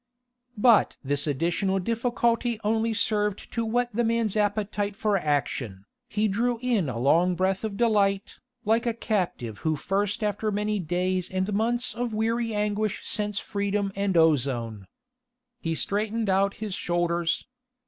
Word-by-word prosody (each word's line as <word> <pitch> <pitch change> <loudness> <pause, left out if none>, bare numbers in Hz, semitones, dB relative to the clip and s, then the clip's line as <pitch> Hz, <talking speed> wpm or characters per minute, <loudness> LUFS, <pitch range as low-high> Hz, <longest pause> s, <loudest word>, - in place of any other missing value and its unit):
But 225 0 +4
this 145 +2 -1
additional 170 +7 0
difficulty 235 +2 0
only 225 +2 +1
served 210 -2 -1
to 230 - 0
whet 240 +2 0
the 240 +3 +1
man's 230 -2 +1
appetite 205 -1 0
for 210 0 +1
action. 140 - -1 0.2
He 215 0 +1
drew 235 +4 0
in 230 - +1
a 120 - -4
long 165 +9 +3
breath 190 +2 0
of 210 -2 -3
delight, 200 -4 +1 0.3
like 225 +3 +2
a 230 - 0
captive 180 - -2
who 160 -1 0
first 200 +7 -1
after 210 +1 0
many 210 +1 -1
days 180 +1 -1
and 190 +2 -1
months 235 +4 +1
of 240 -2 -3
weary 230 +1 0
anguish 210 0 -1
scents 210 -1 0
freedom 200 -1 -1
and 200 -2 0
ozone. 120 - +1 0.7
He 165 -7 -2
straightened 215 +3 -1
out 195 +1 +2
his 215 -3 -5
shoulders. 175 -1 0
205 Hz, 145 wpm, -26 LUFS, 180-220 Hz, 0.7 s, But